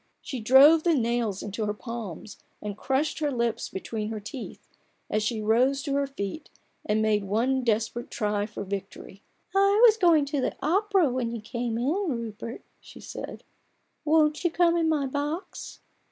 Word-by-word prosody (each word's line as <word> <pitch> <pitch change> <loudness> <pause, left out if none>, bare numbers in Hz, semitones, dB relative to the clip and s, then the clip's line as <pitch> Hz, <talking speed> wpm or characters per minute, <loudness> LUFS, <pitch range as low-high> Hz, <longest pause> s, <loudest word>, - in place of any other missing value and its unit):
She 260 - -5
drove 270 +8 +7
the 335 0 +2
nails 235 -5 -1
into 210 +2 -4
her 210 - -2
palms, 220 -4 -7 0.2
and 205 -1 -5
crushed 270 +8 -1
her 300 -2 0
lips 235 -3 -1
between 215 +2 -4
her 220 -1 -4
teeth, 225 +5 -9 0.4
as 215 - +1
she 215 0 -2
rose 255 +5 +2
to 280 - -2
her 280 0 +1
feet 270 +2 -6 0.3
and 215 +1 +1
made 210 -2 +2
one 245 +6 +1
desperate 230 +2 -1
try 210 -2 -1
for 210 - -6
victory. 195 0 -7 0.2
" - - -41
I 395 +1 +4
was 450 - +8
just 445 - -14
going 325 -5 +5
to 280 -1 -2
the - - -1
opera 380 - +2
when 245 -2 -1
you 230 0 -5
came 230 +1 -3
in, 240 - -1 0.5
Rupert/' 230 +3 -8 0.2
she - - -14
said; - - -8 0.3
" - - -47
won't 305 0 +3
you 345 - +3
come 340 0 +3
in 330 -1 +2
my 300 -3 +1
box 290 +6 -5
245 Hz, 180 wpm, -27 LUFS, 215-300 Hz, 0.5 s, was